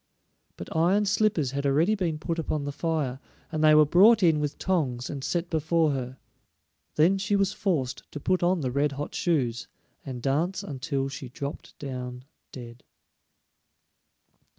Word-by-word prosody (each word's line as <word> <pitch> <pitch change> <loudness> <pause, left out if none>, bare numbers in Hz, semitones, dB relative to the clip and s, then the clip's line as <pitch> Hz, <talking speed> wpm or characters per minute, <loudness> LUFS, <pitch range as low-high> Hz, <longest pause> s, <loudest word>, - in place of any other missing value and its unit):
But - - -8
iron 185 +6 +3
slippers 205 - +1
had 140 +1 -3
already 150 +9 +3
been 175 -7 -1
put 165 +2 -3
upon 155 -2 -2
the 145 - -3
fire, 145 -4 -2 0.3
and 155 -1 -1
they 155 0 +7
were 155 0 +7
brought 200 +8 +6
in 160 -3 +4
with 150 -1 -3
tongs, 135 -10 -1
and 140 -3 -6
set 170 +4 -1
before 160 -1 +1
her. 130 -1 -4 0.8
Then 180 +6 +4
she 200 +1 0
was 195 0 +1
forced 160 - -2
to 150 - -6
put 185 +5 0
on 175 0 +2
the 130 -3 -2
red 140 +2 +1
hot 145 +2 -5
shoes, 125 -9 0 0.4
and 130 -2 -6
dance 150 +9 -1
until 135 -1 -3
she 135 -1 -7
dropped 140 +3 -7
down 125 -2 -6 0.3
dead. 120 -1 -10
150 Hz, 160 wpm, -27 LUFS, 135-175 Hz, 0.8 s, they